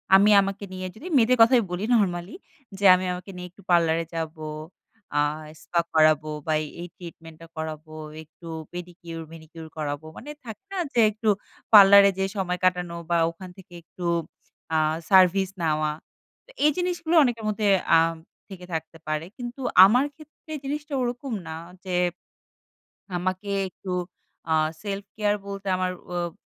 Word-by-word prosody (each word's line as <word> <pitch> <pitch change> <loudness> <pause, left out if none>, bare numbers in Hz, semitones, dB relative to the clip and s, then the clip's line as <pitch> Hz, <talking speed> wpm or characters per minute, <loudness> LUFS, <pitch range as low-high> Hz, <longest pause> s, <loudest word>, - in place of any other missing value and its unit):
আমি 200 +2 +6
আমাকে 195 +1 -4
নিয়ে 185 0 -5
যদি 295 +11 -9
মেয়েদের 250 +1 +4
কথাই 235 +1 +6
বলি 180 +3 -3
নরমালি। 180 -4 +1 0.4
যে, 200 - -1
"আমি 185 +1 -2
আমাকে 180 +2 -8
নিয়ে 180 0 -7
একটু 200 - -19
পার্লারে 165 -1 +3
যাবো, 160 -1 -4 0.7
আ - - +4 0.4
স্পা 170 - 0
করাবো 155 -1 +4 0.2
বা 155 - 0
এই, - - -6
এই 175 - -6
ট্রিটমেন্টটা 165 -2 -12
করাবো, 155 0 -6 0.3
একটু 165 +2 -16 0.3
পেডিকিউর, 175 -2 -8
ম্যানিকিউর 160 0 -11
করাবো।" 145 0 -4
মানে 290 - -9 0.2
থাকে 220 - -9
না 390 - -4 0.2
যে, 235 - +2
একটু 215 +1 -1 0.4
পার্লারে 200 -1 +9
যেয়ে 195 0 -1
সময় 180 -2 -1
কাটানো 180 -2 +1
বা 170 - +3
ওখান 180 +2 -10
থেকে 180 -2 -15
একটু 175 +1 -9 0.7
আ - - +4 0.3
সার্ভিস 190 0 +5
নেওয়া। 155 -1 +1 0.6
তো, - - -16
এই 300 - +6
জিনিসগুলো 350 -2 -1
অনেকের 230 -4 -1
মধ্যে 210 0 0
থেকে 185 - -2
আম 165 0 +2 0.3
থেকে 180 -2 -10
থাকতে 160 +1 -5
পারে। 155 +1 -2
কিন্তু 245 +2 -7 0.2
আমার 245 +7 +4
ক্ষেত্রে 310 0 -13
জিনিসটা 295 +2 -4
ওরকম 245 +1 -3
না। 160 - -5 0.3
যে, 185 - -2 1.2
আমাকে 185 +3 -3 0.2
একটু 185 0 -7 0.6
আ - - +4 0.3
সেলফ 200 -1 -4
কেয়ার 210 -1 +1
বলতে 200 0 -7
আমার 185 0 -1 0.2
উব 175 -1 -2
185 Hz, 155 wpm, -25 LUFS, 165-210 Hz, 1.2 s, পার্লারে